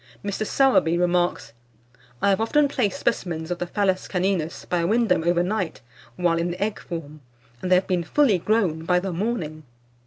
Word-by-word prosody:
Mr. 200 Hz, +1 st, -2 dB
Sowerby 255 Hz, -11 st, +3 dB
remarks 175 Hz, -8 st, 0 dB, 0.7 s
"I 200 Hz, -, +4 dB
have 195 Hz, +1 st, +2 dB
often 285 Hz, +6 st, +3 dB
placed 230 Hz, -8 st, -1 dB
specimens 165 Hz, -2 st, -2 dB
of 175 Hz, -, -2 dB
the 175 Hz, -, -3 dB
Phallus 190 Hz, 0 st, 0 dB
caninus 180 Hz, -3 st, -1 dB
by 175 Hz, -, 0 dB
a 170 Hz, -, 0 dB
window 215 Hz, -5 st, +2 dB
over 175 Hz, +1 st, +2 dB
night, 185 Hz, -3 st, -2 dB, 0.3 s
while 170 Hz, +1 st, +1 dB
in 170 Hz, +1 st, -1 dB
the 175 Hz, -, -5 dB
egg 210 Hz, 0 st, -2 dB
form, 155 Hz, -3 st, -7 dB, 0.4 s
and 185 Hz, -, -3 dB
they -, -, +8 dB
have 185 Hz, +1 st, +2 dB
been 180 Hz, -2 st, 0 dB
fully 225 Hz, -, +3 dB
grown 180 Hz, -6 st, +1 dB
by 180 Hz, +2 st, +2 dB
the 185 Hz, 0 st, -4 dB
morning." 170 Hz, -6 st, -3 dB
180 Hz, 185 wpm, -24 LUFS, 170-205 Hz, 0.7 s, they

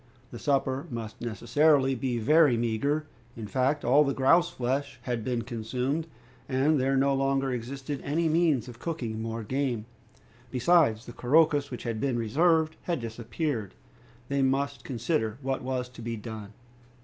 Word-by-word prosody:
The -, -, -8 dB
supper 135 Hz, +1 st, 0 dB
must 115 Hz, -3 st, -6 dB
necessarily 135 Hz, +5 st, +2 dB
be 125 Hz, -1 st, -2 dB
very 145 Hz, +2 st, +4 dB
meager. 130 Hz, +7 st, 0 dB, 0.3 s
In 110 Hz, -, -5 dB
fact, 130 Hz, +6 st, 0 dB
all 140 Hz, +5 st, +6 dB
the 140 Hz, -2 st, -1 dB
grouse 170 Hz, +6 st, +4 dB
flesh 130 Hz, +2 st, -2 dB
had 120 Hz, -4 st, -2 dB
been 120 Hz, -1 st, -1 dB
consumed, 125 Hz, +7 st, -2 dB, 0.4 s
and 140 Hz, +3 st, +2 dB
there 135 Hz, +1 st, +2 dB
no 140 Hz, +1 st, +3 dB
longer 135 Hz, 0 st, +1 dB
existed 135 Hz, +3 st, -4 dB
any 160 Hz, +4 st, 0 dB
means 155 Hz, -6 st, +2 dB
of 120 Hz, -1 st, -10 dB
cooking 120 Hz, -10 st, -4 dB
more 115 Hz, 0 st, -4 dB
game. 125 Hz, -2 st, -1 dB, 0.6 s
Besides, 125 Hz, -3 st, +3 dB
the 120 Hz, -, -9 dB
couroucous 145 Hz, +2 st, +3 dB
which 125 Hz, -, -7 dB
had 115 Hz, -2 st, -3 dB
been 130 Hz, -3 st, 0 dB
reserved 160 Hz, +7 st, +2 dB
had 170 Hz, -4 st, -2 dB
disappeared. 115 Hz, -, -3 dB, 0.5 s
They 140 Hz, +1 st, 0 dB
must 135 Hz, +1 st, 0 dB
consider 120 Hz, -2 st, -1 dB
what 135 Hz, 0 st, -1 dB
was 125 Hz, -1 st, -2 dB
to 125 Hz, -, -12 dB
be 115 Hz, 0 st, -3 dB
done. 110 Hz, -1 st, -8 dB
130 Hz, 155 wpm, -28 LUFS, 115-145 Hz, 0.6 s, all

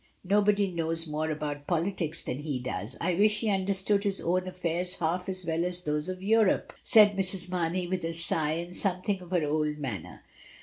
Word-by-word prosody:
Nobody 200 Hz, 0 st, +2 dB
knows 165 Hz, -1 st, -1 dB
more 155 Hz, 0 st, -2 dB
about 150 Hz, -2 st, -4 dB
politics 170 Hz, -2 st, -1 dB
than 125 Hz, -, -4 dB
he 145 Hz, -3 st, -3 dB
does; 125 Hz, -1 st, -5 dB
I 175 Hz, +2 st, 0 dB
wish 210 Hz, +4 st, +3 dB
he 220 Hz, -2 st, +1 dB
understood 195 Hz, +1 st, +1 dB
his 200 Hz, -2 st, 0 dB
own 185 Hz, +2 st, 0 dB
affairs 180 Hz, 0 st, -2 dB
half 175 Hz, +3 st, -1 dB
as 185 Hz, -1 st, -4 dB
well 165 Hz, 0 st, 0 dB
as 180 Hz, 0 st, -1 dB
those 150 Hz, +2 st, -1 dB
of 185 Hz, 0 st, -5 dB
Europe," 220 Hz, -1 st, +2 dB
said 210 Hz, -3 st, +6 dB
Mrs. 185 Hz, -1 st, +1 dB
Mamey, 180 Hz, 0 st, -1 dB
with 180 Hz, 0 st, -3 dB
a 165 Hz, 0 st, -2 dB
sigh 160 Hz, -2 st, +1 dB
and 175 Hz, +2 st, -5 dB
something 190 Hz, 0 st, 0 dB
of 180 Hz, -, -11 dB
her 180 Hz, -3 st, +1 dB
old 150 Hz, 0 st, 0 dB
manner. 125 Hz, -, -6 dB
180 Hz, 190 wpm, -28 LUFS, 160-190 Hz, -, said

